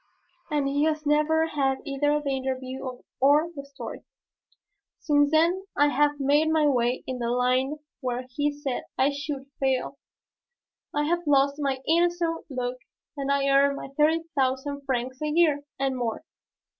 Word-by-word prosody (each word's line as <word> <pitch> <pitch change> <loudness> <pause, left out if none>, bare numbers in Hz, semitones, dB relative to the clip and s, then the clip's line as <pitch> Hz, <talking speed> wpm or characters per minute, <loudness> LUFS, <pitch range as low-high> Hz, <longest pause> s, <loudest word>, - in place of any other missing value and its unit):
And 295 -3 0
he 285 +2 +1
has 310 -1 -1
never 305 +2 +3
had 275 -4 0
either 290 +2 +1
the 285 -2 -3
interview 260 0 -4 0.4
or 295 +5 +4
the 280 - -6
story. 280 0 -8 1.0
Since 290 -1 +3
then 340 +5 +2
I 290 0 +5
have 290 +1 +2
made 290 +3 +3
my 315 -1 +3
way 250 -3 +1
in 255 -1 -4
the 235 -1 -1
line 255 +4 +1 0.2
where 250 -2 -3
he 290 +4 -1
said 285 -3 -4
I 270 +2 +3
should 285 -1 -5
fail. 265 +1 0 0.9
I 295 - 0
have 345 +2 -1
lost 280 0 +3
my 270 -2 -1
innocent 340 0 +1
look 255 -2 -3 0.4
and 280 -1 -2
I 280 0 +2
earn 275 0 +4
my 275 - -7
thirty 315 +2 +3
thousand 275 +1 -1
francs 255 +1 -2
a 305 - -1
year, 305 -2 +3 0.2
and 270 -1 0
more. 235 -3 -3
280 Hz, 155 wpm, -26 LUFS, 265-300 Hz, 1.0 s, I